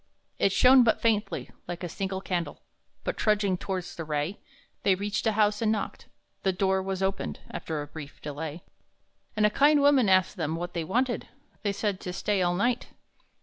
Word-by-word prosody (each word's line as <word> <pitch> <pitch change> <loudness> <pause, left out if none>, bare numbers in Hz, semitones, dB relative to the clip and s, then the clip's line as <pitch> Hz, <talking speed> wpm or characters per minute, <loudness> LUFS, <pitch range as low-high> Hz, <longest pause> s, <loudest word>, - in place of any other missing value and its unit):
It 195 - +3
shone 255 +5 +7
but 225 - +3
faintly, 220 -2 0 0.2
like 175 +1 -5
a - - -1
single 190 +2 -3
candle, 175 -3 -3 0.4
But, - - -2
trudging 205 -3 +2
towards 185 -1 -4
the 165 - -4
ray, 150 +5 -2 0.4
They 195 - +4
reached 205 +3 -2
a 220 - +3
house 210 0 +2
and 220 -1 +3
knocked; 215 - -3 0.3
the 190 - +2
door 190 +1 +1
was 190 0 -3
opened 195 0 -2
After 155 -2 -4
a - - -9
brief 145 -1 -10
delay, 150 +3 -6 0.7
And 210 - +4
a 210 - +4
kind 290 +5 +5
woman 280 -6 +5
asked 185 +1 +3
them 160 -2 -1
what 175 +1 -4
they 170 - -2
wanted. 240 +9 0 0.3
They 205 - 0
said: 200 -1 -2
"To 180 - -5
stay 200 +1 0
all 175 0 +2
night." 240 +6 0
195 Hz, 190 wpm, -28 LUFS, 175-215 Hz, 0.7 s, shone